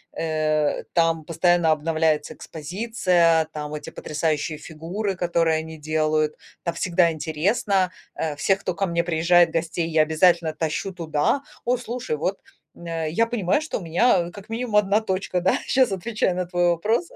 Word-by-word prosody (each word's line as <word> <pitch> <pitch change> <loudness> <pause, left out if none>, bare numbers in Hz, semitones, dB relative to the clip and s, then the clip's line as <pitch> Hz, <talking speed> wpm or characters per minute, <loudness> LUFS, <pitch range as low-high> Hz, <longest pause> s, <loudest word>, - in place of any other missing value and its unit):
э, 155 -2 0
там 165 -2 +2
постоянно 170 0 +2
обновляется 155 0 0
экспозиция, 175 -1 +1
там 150 -1 -6
эти 150 - -6
потрясающие 155 0 -2
фигуры, 165 +7 -4
которые 170 -2 +1
они 160 0 -6
делают, 155 0 0 0.3
там 170 - -1
всегда 170 -2 +2
интересно. 180 +5 0 0.2
Э, 155 -2 -2
всех, 190 +6 +1
кто 185 - -3
ко 195 - 0
мне 170 -1 0
приезжает 170 0 +4
гостей, 165 0 -1
я 155 -1 +4
обязательно 160 0 +3
тащу 165 +5 -3
туда. 165 - 0 0.2
О, 250 +1 +2
слушай, 240 -8 -4
вот, 185 +6 -2 0.4
м, 170 - -12
э, 165 -2 -2
я 230 +7 +2
понимаю, 225 -2 +1
что 310 - -3
у - - -10
меня, 180 +7 +3
а, 175 - -9
как 200 +3 -12
минимум 230 -1 -3
1 210 +1 +4
точка, 185 -3 -2
да? 185 - +3
Сейчас 255 -4 +3
отвечая 195 0 -1
на 180 - -1
твой 175 0 +1
вопрос. 215 - 0
170 Hz, 165 wpm, -23 LUFS, 160-190 Hz, 0.4 s, приезжает